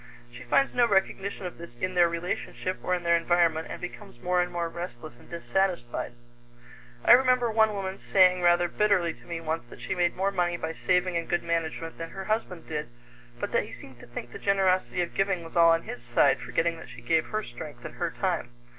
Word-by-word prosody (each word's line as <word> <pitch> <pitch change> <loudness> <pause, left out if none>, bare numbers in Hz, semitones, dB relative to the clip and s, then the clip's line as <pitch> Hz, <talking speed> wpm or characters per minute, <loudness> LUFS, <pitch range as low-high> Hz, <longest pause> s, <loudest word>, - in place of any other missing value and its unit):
She 125 - -10
finds 195 - +2
no 240 -1 +4
recognition 195 -1 0
of 180 - -7
this 170 - -8
in 185 +7 -1
their 175 -1 +5
relationship 175 +2 -3
or 180 - +1
in 175 - -5
their 170 0 +4
environment 170 -1 +2
and - - -6
becomes 120 0 -9
more 180 +6 +1
and 180 0 -2
more 170 -1 -1
restless 165 -8 -8
and - - -18
dissatisfied. 170 -8 -1 0.9
I - - +7
remember 250 -2 +5
one 220 -1 +3
woman 195 -1 -4
saying 185 -2 +4
rather 175 0 +4
bitterly 185 -4 +2
to - - -19
me 170 -1 -4
once 160 -5 -3
that - - -13
she - - -3
made 175 -1 +1
more 195 +2 +1
money 175 -2 0
by 160 -1 -3
saving 180 0 +1
and 170 - -4
good 175 - +1
management 165 -1 -2
than 165 0 -5
her 190 +2 -7
husband 215 -6 -2
did, 150 -5 -4 0.5
but - - -3
that - - +2
he - - -11
seemed 130 -2 -12
to - - -13
think 120 0 -7
the - - -8
generosity 185 -2 +2
of 170 - -6
giving 195 -3 0
was 165 - -11
all 170 -1 +7
on 165 0 +3
his 120 - -7
side, 120 +3 +3
forgetting 170 0 -1
that 165 - -11
she 120 -1 -11
gave 160 +6 +2
her 215 0 -2
strength 120 -8 -9
and - - -8
her - - 0
time. 120 - -2
175 Hz, 220 wpm, -27 LUFS, 165-190 Hz, 0.9 s, I